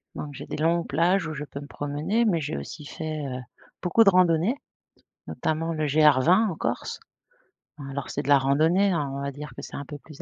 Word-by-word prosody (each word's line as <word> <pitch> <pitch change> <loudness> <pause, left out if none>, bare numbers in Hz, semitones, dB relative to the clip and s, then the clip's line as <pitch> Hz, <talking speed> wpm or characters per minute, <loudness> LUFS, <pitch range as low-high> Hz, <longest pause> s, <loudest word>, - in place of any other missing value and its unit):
donc 145 -1 -6
j'ai - - -8
des - - -5
longues 165 +2 +1
plages 170 +5 +2
où 155 - -4
je 150 0 -5
peux 140 0 -8
me 145 - -9
promener 150 +12 -1
mais 170 -7 +2
j'ai 105 - -3
aussi 70 - -7
fait, 155 -2 -5
heu, 130 -1 -4 0.4
beaucoup 210 +5 +4
de 200 - +7
randonnée 180 - +3 0.7
notamment 165 +1 -1
le 155 -1 -1
GR20 155 - +5
en 165 - -5
Corse. - - -3 0.9
Alors 140 0 -5
c'est 145 - -2
de 145 - -6
la 140 - +8
randonnée, 160 +9 +3
hein, 150 -6 -1
on 140 - -4
va 140 0 -3
dire 150 +2 -8
que - - -7
c'est - - -9
un 140 - -4
peu 145 - -8
plus 150 +1 -13
155 Hz, 215 wpm, -26 LUFS, 145-170 Hz, 0.9 s, la